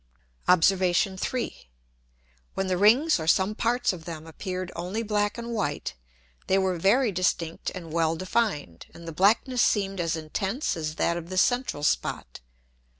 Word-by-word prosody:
Obs. 180 -1 +6
3. 190 - -1 0.9
When 195 - -1
the 185 -1 0
Rings 240 - +5
or 160 - -4
some 190 +4 +3
parts 235 0 +1
of 165 -3 -9
them 160 -2 -7
appeared 185 +2 -5
only 185 +7 -3
black 205 -1 0
and 235 0 -5
white, 145 -10 -2 0.5
they 190 - +3
were 190 -2 0
very 220 +6 +3
distinct 175 -3 -1
and 165 -4 -8
well 165 -1 +1
defined, 180 - -2
and 170 0 -11
the - - -4
blackness 225 - +3
seemed 195 -2 +1
as 165 0 0
intense 195 - -2
as 155 -2 -4
that 170 - 0
of 170 0 -7
the 185 - -4
central 245 - +1
Spot. - - -1
185 Hz, 155 wpm, -26 LUFS, 165-215 Hz, 0.9 s, Obs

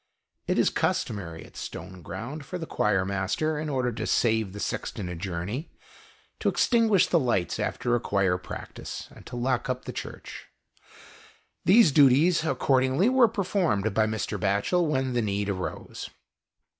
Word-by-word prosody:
It - - +1
is - - +3
customary 85 -6 -2
at - - -18
Stone 95 -1 -7
ground 120 - -6
for 180 +6 -5
the 165 - -5
choirmaster, 100 +9 0
in 155 0 -3
order 130 -3 0
to 115 - -4
save 110 -4 +2
the 105 - -8
sexton 100 - -3
a 90 - -5
journey, 95 - -4 0.7
to - - +2
extinguish 225 -6 +3
the 170 - +2
lights 115 - 0
after 120 - -1
a 120 - +3
choir 95 -5 +1
practice - - -8
and - - -14
to 125 - -7
lock 125 +1 -1
up 125 0 -2
the - - -5
Church. - - -8 1.2
These 195 -1 +7
duties, 145 +5 +5
accordingly, 135 - +2
were 255 -2 +5
performed 180 - 0
by 110 +1 +3
Mr. 110 0 -3
Batchel 105 - +1
when 130 -3 0
the 120 - +1
need 100 -1 -1
arose. 95 -2 -5
125 Hz, 155 wpm, -27 LUFS, 100-155 Hz, 1.2 s, These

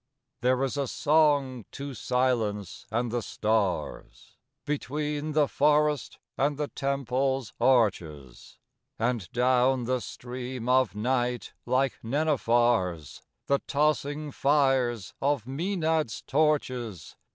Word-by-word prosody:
III - - -56
There 125 +2 +2
is 135 +1 -2
a 140 -1 0
song 145 -6 +2
to 140 0 -6
silence 115 -6 -1
and 120 +1 -1
the 120 0 -1
stars, 105 -4 -2 0.3
Between 150 +1 -2
the 150 -1 +3
forest 150 0 +2 0.2
and 140 +2 +1
the 150 -1 -2
temple's 135 -2 -1
arches; 85 - 0 0.4
And 115 -5 -1
down 125 +1 +2
the 130 +2 0
stream 125 0 -6
of 130 -4 +3
night, 125 +2 -1
like 135 0 +1
nenuphars, 120 - +1 0.2
The 140 0 +2
tossing 150 0 0
fires 135 -8 +1
of 140 -4 +1
the 130 - -8
Mænads' 160 - -1
torches. 130 - -1
130 Hz, 110 wpm, -27 LUFS, 120-145 Hz, 0.4 s, the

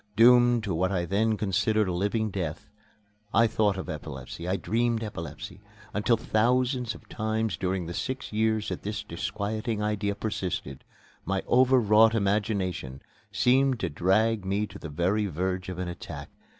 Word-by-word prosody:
Doomed 120 +1 +6
to 100 -4 -2
what 95 +4 +1
I 90 -3 0
then 110 +4 +1
considered 105 +1 +1
a 90 - -1
living 105 +4 0
death, 85 -6 -4 0.6
I 115 - +6
thought 105 -3 +1
of 95 - -5
epilepsy, 75 +2 -7
I 95 - +1
dreamed 115 +2 0
epilepsy, 85 -8 -7 0.3
until 105 +3 +2
thousands 125 +2 +1
of - - -15
times 110 0 -1
during 95 -1 -2
the 85 - -5
six 130 +4 -4
years 110 0 +1
that - - -4
this 105 +1 -4
disquieting 110 +5 -3
idea 105 -1 -1
persisted, 90 -10 -4 0.4
my 95 +1 -1
over 130 +1 +5
wrought 110 +1 +5
imagination 100 - -1 0.3
seemed 125 +5 +3
to - - 0
drag 100 +7 +2
me 100 +3 0
to 100 -1 -11
the 80 - -7
very 95 +8 0
verge 95 +2 -2
of 90 - -5
an 90 -1 -3
attack. 85 -4 -7
105 Hz, 160 wpm, -27 LUFS, 90-110 Hz, 0.6 s, Doomed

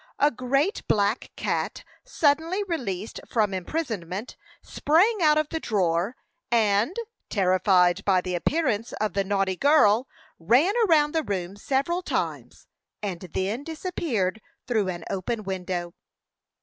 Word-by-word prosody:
A 290 +1 +4
great 275 - 0
black 205 +2 +1
cat, - - -2 0.2
suddenly 330 -2 +1
released 230 - -4
from 210 -4 +1
imprisonment, 200 - -4 0.3
sprang 385 +9 +2
out 305 -2 +5
of 310 -1 +1
the 320 - -3
drawer, 190 - 0 0.3
and, 225 - +2 0.3
terrified 185 -2 +3
by 190 -2 +3
the 180 0 -4
appearance 230 - 0
of 215 0 -2
the 195 - +1
naughty 195 -1 0
girl, 255 - +4 0.3
ran 250 - +3
around 300 -3 +4
the 320 - +2
room 190 - -4
several 275 - -1
times, - - -4 0.4
and 190 -4 -3
then 205 +8 -2
disappeared 290 - -2 0.2
through 220 -5 0
an 175 -2 -4
open 215 +3 -3
window. 180 -2 -4
220 Hz, 125 wpm, -25 LUFS, 190-300 Hz, 0.4 s, out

